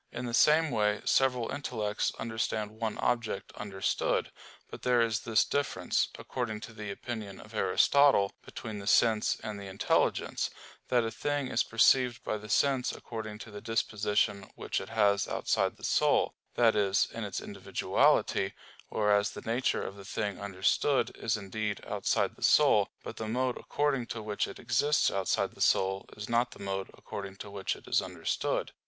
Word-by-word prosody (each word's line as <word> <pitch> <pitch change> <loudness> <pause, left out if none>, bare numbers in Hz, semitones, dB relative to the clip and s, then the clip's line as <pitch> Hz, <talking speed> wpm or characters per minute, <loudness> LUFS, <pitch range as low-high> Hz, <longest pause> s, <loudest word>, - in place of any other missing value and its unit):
In 120 +1 -5
the 120 - -4
same 155 +5 +5
way 105 -2 +1
several 125 -3 +2
intellects 110 -7 -2
understand 110 -2 -2
one 110 0 -3
object 120 -5 -1
understood. 100 -2 -1 0.4
But - - -10
there 125 -1 +3
is 115 -2 +2
this 115 -2 +2
difference, 145 0 0
according 115 -4 -4
to 115 +2 -9
the 105 -2 -7
opinion 105 -3 -6
of 110 - -13
Aristotle, 105 +3 +4
between 110 -2 -7
the 100 - -8
sense 110 0 +3
and 105 -2 -5
the 100 - -8
intelligence 95 0 0 0.4
that 120 -2 +3
a 115 - -2
thing 145 +3 -2
is - - +2
perceived 120 +1 +3
by 110 - -2
the 105 +1 -11
sense 135 +1 +2
according 110 -2 -7
to 110 - -13
the 105 0 -8
disposition 105 -3 0
which - - -2
it - - -8
has 100 -2 +2
outside - - 0
the - - -18
soul - - +2 0.2
that 115 -2 +4
is, 100 -2 +2
in - - -4
its - - -3
individuality; 95 0 +1 0.3
whereas 105 -1 +2
the - - -8
nature 120 +3 0
of 100 - -6
the 100 - -10
thing 100 0 -3
understood 100 +6 +1
is 110 -1 -1
indeed 105 +1 -3
outside - - 0
the - - -20
soul, - - +5
but - - -7
the 110 - -4
mode 125 +2 0
according 140 -5 -1
to 115 -2 -5
which 105 -1 -1
it - - -9
exists 130 +6 +2
outside 95 -1 0
the - - -12
soul 95 0 +2
is 105 0 -6
not 120 +1 +2
the - - -10
mode 95 -1 -3
according 100 -1 -7
to 100 +1 -9
which 100 -1 -2
it - - -16
is - - +3
understood. - - -2
110 Hz, 170 wpm, -30 LUFS, 100-120 Hz, 0.4 s, same